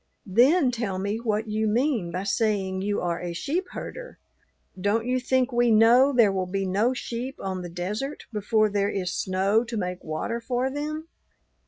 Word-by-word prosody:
Then 255 Hz, -, +4 dB
tell 225 Hz, -6 st, -3 dB
me 200 Hz, +3 st, -2 dB
what 220 Hz, -1 st, -1 dB
you 215 Hz, +1 st, 0 dB
mean 230 Hz, -, +1 dB
by 180 Hz, +2 st, -3 dB
saying 200 Hz, -3 st, 0 dB
you 205 Hz, +1 st, -1 dB
are 175 Hz, -1 st, -2 dB
a 175 Hz, -1 st, -4 dB
sheep 330 Hz, -, -2 dB
herder; -, -, -7 dB, 0.6 s
don't 205 Hz, +4 st, 0 dB
you 255 Hz, +1 st, +1 dB
think 260 Hz, 0 st, +1 dB
we 240 Hz, 0 st, +3 dB
know 230 Hz, +5 st, +6 dB
there 235 Hz, -6 st, +5 dB
will 190 Hz, -1 st, -2 dB
be 195 Hz, +1 st, -2 dB
no 210 Hz, +7 st, +1 dB
sheep 245 Hz, +3 st, -5 dB
on 190 Hz, -1 st, -3 dB
the 175 Hz, -, -6 dB
desert 205 Hz, -, -4 dB
before 215 Hz, +1 st, +2 dB
there 200 Hz, -1 st, 0 dB
is 180 Hz, -3 st, -2 dB
snow 195 Hz, +4 st, +1 dB
to 235 Hz, -1 st, -5 dB
make 180 Hz, -2 st, -3 dB
water 160 Hz, +9 st, -3 dB
for 250 Hz, +2 st, -1 dB
them?" 305 Hz, +3 st, -4 dB
215 Hz, 180 wpm, -26 LUFS, 190-245 Hz, 0.6 s, know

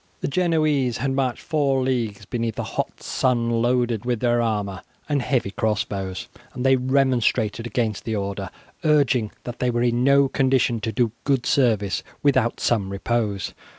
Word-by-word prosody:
The -, -, -1 dB
Genoese 155 Hz, -6 st, +1 dB
had 135 Hz, +3 st, -1 dB
marched 135 Hz, -2 st, -1 dB
four 140 Hz, -4 st, +1 dB
leagues 115 Hz, -6 st, -2 dB
beneath 115 Hz, 0 st, -3 dB
a -, -, -2 dB
hot -, -, -4 dB
sun 120 Hz, -3 st, +1 dB
loaded 120 Hz, -2 st, +1 dB
with 120 Hz, -2 st, -1 dB
their 120 Hz, 0 st, +2 dB
armour 105 Hz, -4 st, -2 dB, 0.3 s
and 145 Hz, -2 st, +1 dB
heavy 120 Hz, -6 st, 0 dB
cross 105 Hz, 0 st, 0 dB
bows, 95 Hz, -2 st, -5 dB, 0.3 s
and 125 Hz, +1 st, -3 dB
they 135 Hz, 0 st, +6 dB
remonstrated 125 Hz, -4 st, +1 dB
against 115 Hz, -4 st, -1 dB
the 110 Hz, -2 st, -2 dB
order, 100 Hz, -1 st, -3 dB, 0.3 s
urging 140 Hz, -8 st, +3 dB
that 120 Hz, 0 st, -7 dB
they 125 Hz, -, +1 dB
were 120 Hz, 0 st, 0 dB
in 120 Hz, 0 st, +1 dB
no 140 Hz, +1 st, +5 dB
condition 130 Hz, -3 st, +1 dB
to 110 Hz, +1 st, -3 dB
do 115 Hz, +1 st, +1 dB
good 135 Hz, -3 st, +1 dB
service 110 Hz, -7 st, +2 dB, 0.2 s
without 130 Hz, -5 st, +2 dB
some 105 Hz, -5 st, +1 dB
repose. 100 Hz, -1 st, -2 dB
120 Hz, 165 wpm, -23 LUFS, 110-130 Hz, 0.3 s, they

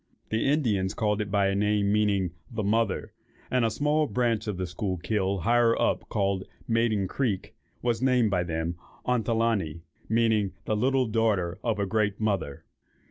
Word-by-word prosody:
The 110 Hz, +3 st, 0 dB
Indians 110 Hz, -10 st, +1 dB
called 105 Hz, -1 st, 0 dB
it 105 Hz, -, -3 dB
by 100 Hz, -1 st, +2 dB
a 100 Hz, -, +2 dB
name, 105 Hz, 0 st, +2 dB
meaning 100 Hz, -4 st, +2 dB, 0.2 s
"The 110 Hz, -3 st, -3 dB
Mother;" 110 Hz, 0 st, 0 dB, 0.4 s
and 125 Hz, -1 st, +2 dB
a 115 Hz, -, +3 dB
small 150 Hz, +6 st, +1 dB
branch 115 Hz, -4 st, 0 dB
of 105 Hz, -3 st, -2 dB
the 90 Hz, -, -2 dB
Schuylkill, 95 Hz, +2 st, -2 dB
higher 120 Hz, +4 st, +3 dB
up, -, -, 0 dB
called 100 Hz, -2 st, 0 dB, 0.2 s
"Maiden 115 Hz, -4 st, +1 dB
Creek," 105 Hz, -4 st, -2 dB, 0.3 s
was 120 Hz, -1 st, 0 dB
named 125 Hz, -4 st, +3 dB
by 90 Hz, -2 st, +1 dB
them, 80 Hz, 0 st, -2 dB, 0.3 s
Ontelaunee, 115 Hz, -9 st, 0 dB, 0.3 s
meaning 110 Hz, -3 st, +2 dB
"the 110 Hz, -, 0 dB
little 130 Hz, +4 st, +2 dB
daughter 105 Hz, -5 st, 0 dB
of 115 Hz, -3 st, 0 dB
a 100 Hz, -, 0 dB
great 105 Hz, 0 st, 0 dB
mother." 100 Hz, -10 st, -2 dB
105 Hz, 160 wpm, -27 LUFS, 95-115 Hz, 0.4 s, a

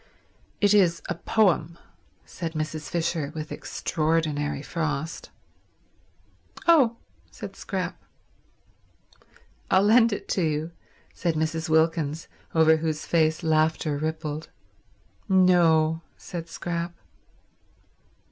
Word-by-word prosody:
"It 205 Hz, 0 st, +4 dB
is 180 Hz, -5 st, +3 dB
a -, -, +1 dB
poem," 170 Hz, -7 st, +1 dB, 0.5 s
said 165 Hz, -2 st, -6 dB
Mrs. 155 Hz, -2 st, -4 dB
Fisher 165 Hz, -2 st, -1 dB
with 155 Hz, 0 st, -6 dB
extraordinary 155 Hz, -3 st, -1 dB
frost. 155 Hz, -1 st, -3 dB, 1.4 s
"Oh," 270 Hz, -9 st, +5 dB, 0.3 s
said -, -, -9 dB
Scrap. -, -, -4 dB, 1.7 s
"I'll 190 Hz, +1 st, +4 dB
lend 230 Hz, +2 st, +5 dB
it 205 Hz, -, -4 dB
to 190 Hz, -, 0 dB
you," 155 Hz, 0 st, -1 dB, 0.4 s
said 170 Hz, -2 st, -1 dB
Mrs. 160 Hz, +1 st, -1 dB
Wilkins, 160 Hz, -1 st, +1 dB, 0.3 s
over 160 Hz, 0 st, +5 dB
whose 155 Hz, -1 st, -2 dB
face 160 Hz, 0 st, +1 dB
laughter 155 Hz, -1 st, +1 dB
rippled. 155 Hz, 0 st, -4 dB, 0.8 s
"No," 165 Hz, -4 st, +4 dB, 0.2 s
said 170 Hz, -2 st, -7 dB
Scrap. 170 Hz, 0 st, -4 dB
160 Hz, 95 wpm, -26 LUFS, 155-175 Hz, 1.7 s, Oh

